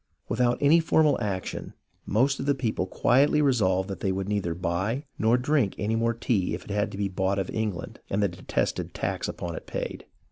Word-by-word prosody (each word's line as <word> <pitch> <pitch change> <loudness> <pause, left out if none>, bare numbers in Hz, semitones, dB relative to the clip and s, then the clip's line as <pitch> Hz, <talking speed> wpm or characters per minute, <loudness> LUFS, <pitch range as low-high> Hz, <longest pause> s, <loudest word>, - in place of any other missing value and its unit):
Without 120 -1 +2
any 145 +4 +6
formal 155 -4 +3
action 100 -4 -4 0.3
the - - -7
most 135 +5 +3
of 135 - -3
the 140 - +3
people 110 -8 -1
quietly 135 +9 +3
resolved 100 -10 +2
that 95 - -5
they 95 - 0
would 95 0 -2
neither 100 -5 -1
buy 95 - -1
nor 115 +3 +4
drink 130 -5 +1
any 110 +2 0
more 115 +1 +1
tea 110 -5 0
if - - -8
it - - -8
had 105 +1 0
to - - -7
be 100 -1 0
bought 95 +1 0
of 95 -2 -2
England 105 -6 -3
and 100 +1 +1
the - - +4
de 90 -1 -10
tested - - -2
tax - - -2
upon 85 -2 -5
it - - -8
paid. - - -5
105 Hz, 215 wpm, -27 LUFS, 95-125 Hz, 0.3 s, any